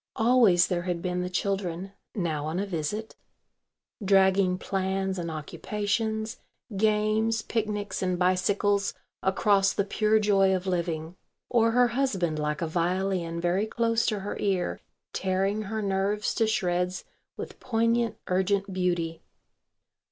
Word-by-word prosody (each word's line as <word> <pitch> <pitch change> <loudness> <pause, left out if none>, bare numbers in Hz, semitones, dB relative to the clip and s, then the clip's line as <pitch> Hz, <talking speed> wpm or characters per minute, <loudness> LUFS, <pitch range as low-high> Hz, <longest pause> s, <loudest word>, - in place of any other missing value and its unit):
Always 225 -7 +5
there 180 -3 -1
had 175 -1 -2
been 180 -1 -1
the 180 - -3
children 190 -1 -2 0.2
(now 155 -6 -1
on 160 +3 -2
a 200 - 0
visit) 195 +5 -4 0.9
dragging 190 -1 +4
plans 190 0 -2
and 170 -1 -3
occupations, 210 +7 -2 0.4
games, 215 +2 +2
picnics, 210 -2 -2
and 185 -1 0
bicycles 195 +2 +1 0.3
across 195 0 +3
the 200 - +1
pure 215 +1 +2
joy 195 -3 +3
of 185 0 -3
living, 170 -2 -2 0.3
or 230 -2 +4
her 245 +1 +4
husband 195 - 0
like 150 +1 -1
a - - -1
violin 175 0 -1
very 180 +5 +1
close 230 0 +1
to 215 -4 0
her 205 - -4
ear 190 -3 -1 0.3
tearing 195 +3 0
her 215 +1 -3
nerves 200 +2 0
to 225 - +1
shreds 180 -3 0 0.3
with - - -7
poignant 230 -1 +1
urgent 195 +1 0
beauty. 175 -3 -1
195 Hz, 130 wpm, -27 LUFS, 180-215 Hz, 0.9 s, Always